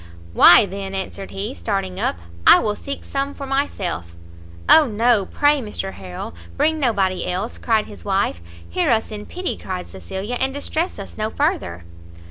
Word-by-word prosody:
"Why 175 - +8
then," 195 0 -6
answered 195 0 -5
he, 205 +6 -4
starting 195 -6 -3
up, - - 0 0.3
"I - - +10
will 210 -1 0
seek 280 +5 -6
some 275 +1 -3
for 280 - -6
myself." 195 - -2 0.5
"O 315 -2 +7
no, 225 -2 +2
pray, 290 -1 +2
Mr 210 -3 -5
Harrel, 90 -3 -7 0.2
bring 315 0 +2
nobody 195 -9 +1
else," 185 +5 -3
cried 220 -3 +2
his 205 - -12
wife. 195 - 0 0.3
"Hear 85 - 0
us 225 -2 +2
in 210 -1 -7
pity," 360 0 -3
cried 185 -1 -5
Cecilia, 190 - -5
"and 265 +1 0
distress 315 +4 -2
us 200 +1 -9
no 215 0 0
further." 290 - -1
210 Hz, 165 wpm, -21 LUFS, 190-270 Hz, 0.5 s, I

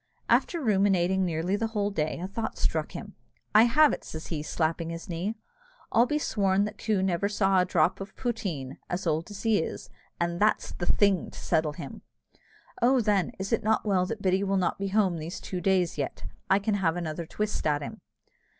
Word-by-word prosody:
After 340 - +3
ruminating 190 - +2
nearly 170 +3 0
the 225 +2 -1
whole 205 0 +1
day, 155 -5 -1
a 180 - -3
thought 220 +3 -4
struck - - -1
him. - - -7 0.4
"I 215 +2 +8
have 295 +6 +5
it," - - -5
says 160 0 -7
he, 155 -3 -2
slapping 160 +1 -1
his 165 0 -6
knee; 180 +6 -3 0.6
"I'll 235 +2 +4
be 300 - +1
sworn 200 -7 +1
that 210 0 -7
Coo 210 -4 +1
never 190 +1 +1
saw 195 -2 +3
a 180 - +3
drop 175 +1 +2
of 195 0 -8
poteen, 175 - -3
as 180 +2 -3
old 160 +2 0
as 205 -1 -8
he 225 -2 +3
is, 160 - -5 0.3
and 170 0 -1
that's 215 +1 +2
the 175 - -4
thing 200 -3 +3
to - - -13
settle 160 -3 +1
him! - - -8 0.8
Oh! 255 +2 +5
then, 205 -6 +1
is 195 +3 -3
not 220 +1 +2
it - - -5
well 185 -2 +2
that 215 0 -5
Biddy 190 +1 +2
will 195 0 +1
not 180 0 0
be 200 - -1
home 190 -4 +2
these 160 +3 -6
two 180 -2 -5
days 180 -4 +1
yet; 140 - -3 0.3
I 195 - +5
can 205 +2 0
have 165 -2 +2
another 165 -1 -4
twist 210 -3 -2
at 145 -1 +1
him." - - -8
190 Hz, 205 wpm, -28 LUFS, 170-210 Hz, 0.8 s, I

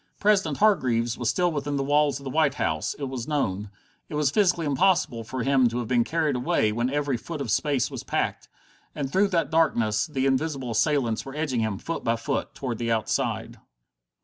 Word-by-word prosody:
President 195 -8 +2
Hargreaves 125 - +2
was 120 -1 -1
still 180 -1 +1
within 145 -1 -2
the 140 - 0
walls 145 -1 +2
of - - -13
the 135 - -5
White 150 -2 +2
House, 80 - -1
it 145 - -8
was 130 -3 -4
known; 105 -9 -1 0.4
it - - -5
was 150 -3 +2
physically 175 -3 +2
impossible 145 -6 +2
for 125 +2 -4
him 135 -1 +4
to 120 - -4
have 120 -2 -3
been 120 -1 +3
carried 155 0 0
away 115 -3 +1
when 120 +3 0
every 145 -2 0
foot 160 +6 -7
of 130 -6 -3
space 140 +4 +1
was - - -6
packed. - - -2 0.5
And 135 -2 -3
through 195 +5 +3
that 170 -4 0
darkness 120 -10 +2
the 135 -4 -1
invisible 135 -2 0
assailants 120 -1 +1
were 135 +1 -9
edging 150 -6 -1
him, 110 -3 -1
foot 165 +10 -5
by 115 - +1
foot, 135 +4 -3
toward 125 -5 -4
the 115 -1 -1
outside. 110 -1 -1
135 Hz, 200 wpm, -25 LUFS, 120-150 Hz, 0.5 s, him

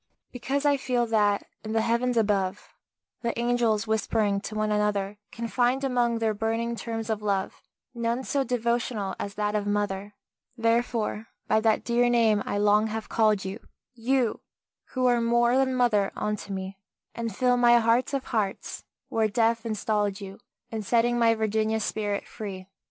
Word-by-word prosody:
Because 270 +4 -2
I 285 -1 +4
feel 250 -2 0
that, 210 -3 +2 0.2
in 215 0 -4
the 225 - +2
Heavens 235 +2 +1
above, 200 -3 0 0.5
The 235 -1 -2
angels, 235 -3 +1
whispering 215 -2 0
to 215 - -6
one 215 0 0
another, 210 -1 0
Can 230 0 -5
find, 250 +3 +1
among 245 -3 +1
their 225 -1 0
burning 225 +2 -1
terms 225 -1 -4
of 215 -1 -2
love, 200 -2 -2 0.3
None 235 +1 -1
so 275 +1 0
devotional 235 -5 -1
as 200 -1 -5
that 210 0 -1
of 205 -1 -1
"Mother," 205 0 -2 0.4
Therefore 230 -1 0 0.2
by 220 - +3
that 220 -1 +2
dear 240 0 +2
name 225 -3 +3
I - - -1
long 210 +1 +3
have 220 0 -5
called 215 -4 +2
you 195 +4 -5 0.3
You 245 0 0 0.4
who 255 -1 -2
are 240 -1 +3
more 235 +1 +3
than 260 -1 +2
mother 220 -6 +2
unto 210 -1 -3
me, 190 0 -5 0.3
And 230 -3 -4
fill 250 +1 +3
my 240 -1 +6
heart 235 +2 +2
of 270 - -2
hearts, 210 -6 -3 0.3
where 220 -1 +2
Death 230 +2 +1
installed 210 -2 -1
you, 195 +1 -9 0.3
In 220 -1 -3
setting 240 +3 +2
my 230 -1 +4
Virginia's 220 0 0
spirit 205 -1 -2
free. 190 -3 -7
225 Hz, 165 wpm, -26 LUFS, 210-240 Hz, 0.5 s, my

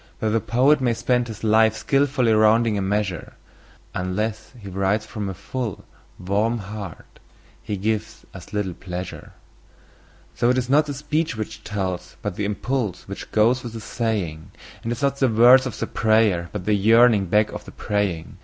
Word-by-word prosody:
Though 110 - 0
the 115 - +2
poet 135 +7 +3
may 120 -2 +1
spend 120 +1 +1
his 110 -1 -9
life 110 0 +4
in - - -8
skilfully 135 -4 +2
rounding 110 +1 +4
a 100 - -1
measure, 95 -2 -2 0.6
Unless 105 +4 -3
he 100 - -10
writes 95 +3 0
from 105 -2 -5
a 95 - -5
full, 120 +1 -5 0.3
warm 105 +6 0
heart 100 -3 -9 0.4
he 110 -3 -4
gives 110 +2 -3
us 90 -2 -11
little 105 -3 -2
pleasure. 90 +1 -7 1.0
So 120 +1 +1
it 125 - +2
is 125 0 -1
not 150 +2 +4
the 145 - -4
speech 150 0 -1
which 110 -1 -6
tells, 95 -3 -4
but - - -3
the 105 - -2
impulse 110 0 -2
which - - -8
goes 115 +4 +3
with 120 -2 -7
the 115 - -6
saying; 105 -8 -3 0.3
And 115 - -4
it 120 - -2
is - - -7
not 140 0 +1
the 135 - +3
words 125 +4 +6
of 125 - -6
the - - -2
prayer, 110 -6 +2
but 100 -4 -5
the 105 - +2
yearning 110 0 +5
back 105 +4 +2
of - - -8
the - - -10
praying. 100 -6 -2
110 Hz, 185 wpm, -23 LUFS, 100-120 Hz, 1.0 s, words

